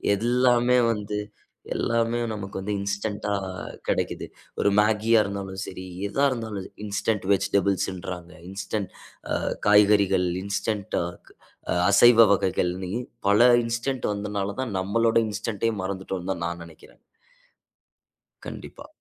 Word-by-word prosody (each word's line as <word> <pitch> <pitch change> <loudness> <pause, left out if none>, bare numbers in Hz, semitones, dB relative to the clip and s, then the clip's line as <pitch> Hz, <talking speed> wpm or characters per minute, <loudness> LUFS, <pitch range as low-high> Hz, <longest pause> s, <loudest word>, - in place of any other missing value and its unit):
எல்லாமே 125 +2 +3
வந்து 105 -1 -3 0.6
எல்லாமே 115 0 0
நமக்கு 100 -2 -5
வந்து 105 +2 -3
இன்ஸ்டன்ட்டா 100 +1 -3 0.6
கெடைக்குது. - - -1 0.3
ஒரு 100 - +3
மேகியா 110 +2 +4
இருந்தாலும் 95 -1 -5
சரி, 95 -1 -7 0.2
எதா 140 +7 +1
இருந்தாலும். 110 -6 -4 0.2
இன்ஸ்டன்ட் 100 0 -1
வெஜிடபிள்ஸ்ன்றாங்க, 95 -2 -1 0.2
இன்ஸ்டன்ட் 100 +1 -4 0.4
ஆ - - +2 0.3
காய்கறிகள், 100 -3 +5 0.2
இன்ஸ்டன்ட் 100 0 -2
ஆ - - 0 0.9
அசைவ 115 +3 +7
வகைகள்னு 90 -1 -1 0.4
பல 115 +5 +6
இன்ஸ்டென்ட் 120 +3 -2
வந்ததனால 100 -1 -3
தான், 125 -5 -4
நம்மளோட 115 +4 +2
இன்ஸ்டன்ட் 105 +1 -3
யே - - -2
மறந்துட்டோன்னு 95 -1 -4
தான் 85 - -6
நா 85 - -1
நெனைக்கிறேன். 85 -2 -16 1.4
கண்டிப்பா. - - -9
100 Hz, 105 wpm, -25 LUFS, 95-115 Hz, 1.4 s, அசைவ